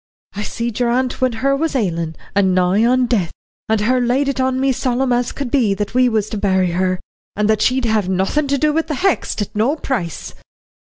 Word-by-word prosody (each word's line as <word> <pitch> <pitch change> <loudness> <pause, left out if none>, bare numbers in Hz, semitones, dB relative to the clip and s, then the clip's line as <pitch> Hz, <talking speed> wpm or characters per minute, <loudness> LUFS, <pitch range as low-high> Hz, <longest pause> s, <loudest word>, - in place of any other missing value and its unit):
I 205 - -5
seed 235 +1 -4
your 245 -1 +2
aunt 255 +2 -1
when 255 -2 +2
her 275 0 +3
was 315 +1 -1
ailin', 170 -8 -1 0.2
and 190 -2 +2
nigh 185 +4 +3
on 255 +1 +3
death, 205 -9 0 0.4
and 220 -1 +2
her 250 +4 +2
laid 250 +4 +1
it 275 -1 -2
on 260 0 0
me 270 0 +2
solemn 255 0 0
as 245 0 0
could 275 -4 -5
be 225 -8 +2
that 205 +2 -4
we 250 0 +4
was 215 -3 0
to 215 - -4
bury 190 -3 +1
her, 185 +1 0 0.4
and 210 0 +1
that 215 -1 +2
she'd 255 +1 +2
have 215 -4 +1
nothin' 190 +11 0
to 280 0 +1
do 300 +2 +1
wi' 325 - +2
the 310 -2 -4
Hexts 355 - 0
at 205 - -11
no 235 +8 +2
price." 220 - -4
235 Hz, 225 wpm, -18 LUFS, 200-260 Hz, 0.4 s, we